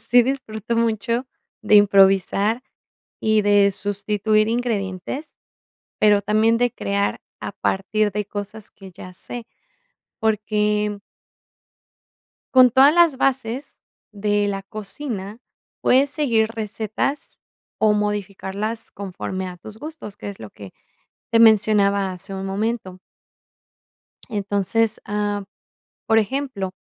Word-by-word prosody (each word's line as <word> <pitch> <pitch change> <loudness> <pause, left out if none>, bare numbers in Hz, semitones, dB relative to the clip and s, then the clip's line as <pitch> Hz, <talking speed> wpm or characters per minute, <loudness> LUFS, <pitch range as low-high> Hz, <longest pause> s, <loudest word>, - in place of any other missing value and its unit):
sí 245 0 +4
disfruto 235 -4 -3
mucho 230 +2 0 0.4
de 210 0 +3
improvisar 200 +3 +4 0.6
y 220 -1 +2
de 205 -1 +4
sustituir 210 +2 0
ingredientes, 225 - -3 0.6
pero 205 -1 +5
también 215 +2 +3
de 245 0 +1
crear 200 -3 -1 0.2
a - - -5
partir 205 +2 0
de 210 +1 -2
cosas 205 +1 -7
que 195 -2 -13
ya 180 +1 -11
sé, 235 +5 -7 0.7
porque 210 -1 0 1.6
con 255 -2 +7
todas 275 +4 +6
las 340 -6 +4
bases 265 -1 -2 0.3
de 205 0 0
la 195 -1 -3
cocina, 210 0 -6 0.4
puedes 270 +2 +4
seguir 235 -8 +1
recetas 220 +5 -4 0.4
o 215 -1 +3
modificarlas 210 +1 -3
conforme 190 -1 -5
a 180 - -8
tus 215 +5 -12
gustos, 295 -9 -9
que - - -6
es 200 - -10
lo 110 - -9
que 100 -3 -12 0.6
te 230 - +3
mencionaba 205 -3 +4
hace 180 +2 0
un 190 0 -5
momento. 195 -2 -3 1.3
Entonces, 205 +1 0
am, 205 -1 -2 0.6
por 225 0 +4
ejemplo, 220 -4 -3
210 Hz, 110 wpm, -22 LUFS, 200-230 Hz, 1.6 s, con